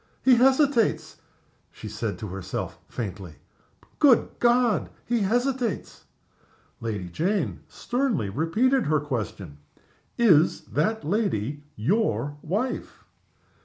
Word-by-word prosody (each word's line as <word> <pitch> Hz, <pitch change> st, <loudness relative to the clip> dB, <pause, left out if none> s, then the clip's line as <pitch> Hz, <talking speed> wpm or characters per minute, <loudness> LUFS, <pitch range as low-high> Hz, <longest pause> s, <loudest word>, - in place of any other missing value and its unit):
"He 260 Hz, -, +6 dB
hesitates!" 260 Hz, -1 st, +3 dB, 0.5 s
she -, -, -9 dB
said 110 Hz, 0 st, -4 dB
to 110 Hz, -, -6 dB
herself, 95 Hz, 0 st, -5 dB
faintly. 95 Hz, -7 st, -6 dB, 0.6 s
"Good 270 Hz, -6 st, +5 dB
God! 240 Hz, -2 st, +3 dB, 0.2 s
he 240 Hz, 0 st, +1 dB
hesitates!" 245 Hz, +3 st, -1 dB, 0.7 s
Lady 105 Hz, -5 st, -4 dB
Jane 180 Hz, -, -1 dB
sternly 245 Hz, -, -1 dB
repeated 215 Hz, -, +1 dB
her 155 Hz, 0 st, +3 dB
question. 105 Hz, -, -5 dB, 0.6 s
"Is 175 Hz, -9 st, +4 dB
that 220 Hz, +1 st, -1 dB
lady 150 Hz, -, -1 dB
your 145 Hz, -, 0 dB
wife?" 210 Hz, +11 st, -3 dB
190 Hz, 95 wpm, -25 LUFS, -, 0.7 s, He